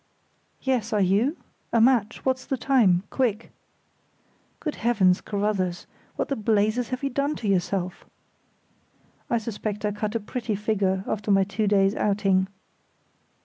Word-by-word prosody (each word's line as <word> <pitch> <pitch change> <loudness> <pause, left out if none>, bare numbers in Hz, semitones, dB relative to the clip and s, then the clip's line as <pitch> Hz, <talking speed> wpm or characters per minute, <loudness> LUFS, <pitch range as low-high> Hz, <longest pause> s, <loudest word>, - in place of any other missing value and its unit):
"Yes; 245 -4 0
are 210 - +2
you? 205 - +2 0.3
A 230 - +3
match! 230 -2 +2
What's 260 0 +1
the 270 - -2
time? 230 -9 +3
Quick!" 235 -4 -1 1.1
"Good 305 -3 -4
Heavens, 200 -6 +3
Carruthers, 200 -4 -1 0.3
what - - -1
the 275 - -1
blazes 215 +2 +1
have 255 +1 -4
you 275 - -1
done 280 +3 0
to 220 - -5
yourself?" 180 -1 -1 1.3
(I 235 - +2
suspect 215 -2 -4
I 210 - +1
cut 210 +1 -3
a - - +2
pretty 225 0 -3
figure 195 -2 0
after 210 0 -3
my 195 -1 +5
two 205 +2 -1
days' 195 -1 +3
outing.) 195 -3 +1
210 Hz, 145 wpm, -25 LUFS, 195-240 Hz, 1.3 s, my